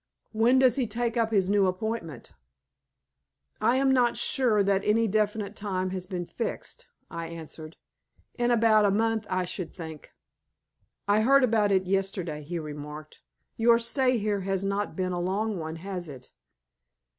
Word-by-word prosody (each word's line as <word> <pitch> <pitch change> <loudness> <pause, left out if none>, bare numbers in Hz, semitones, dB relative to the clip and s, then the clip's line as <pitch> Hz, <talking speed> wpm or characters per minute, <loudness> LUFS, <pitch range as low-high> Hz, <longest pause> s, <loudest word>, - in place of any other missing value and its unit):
When 230 +4 +3
does 260 -2 +4
he 255 -3 0
take 235 +2 -2
up 230 -2 +1
his 195 -4 +2
new 200 -1 +3
appointment?" 185 - -4 1.3
"I 230 +3 +3
am 270 0 +3
not 245 -2 +3
sure 225 -6 +2
that 195 0 +1
any 225 +2 +2
definite 210 0 -1
time 185 -3 -2
has 185 -1 -5
been 180 -2 -4
fixed," - - -5 0.2
I 165 0 -5
answered. 160 -1 -9 0.6
"In 240 -1 0
about 225 -2 +4
a 205 - +4
month 220 +1 0
I 185 0 0
should 180 -1 -5
think." 160 -3 -9 1.0
"I 205 +1 +3
heard 275 +4 +5
about 220 -4 +2
it 190 -1 +2
yesterday," 185 -5 -2
he 170 +4 -5
remarked. 150 0 -8 0.4
"Your 230 +1 +5
stay 255 +2 +1
here 210 -1 -1
has 195 0 -2
not 200 +1 -2
been 185 -1 -1
a 175 -1 -2
long 200 +2 -1
one, 160 0 -5
has 180 -1 -6
it?" 130 -3 -12
200 Hz, 160 wpm, -27 LUFS, 180-225 Hz, 1.3 s, heard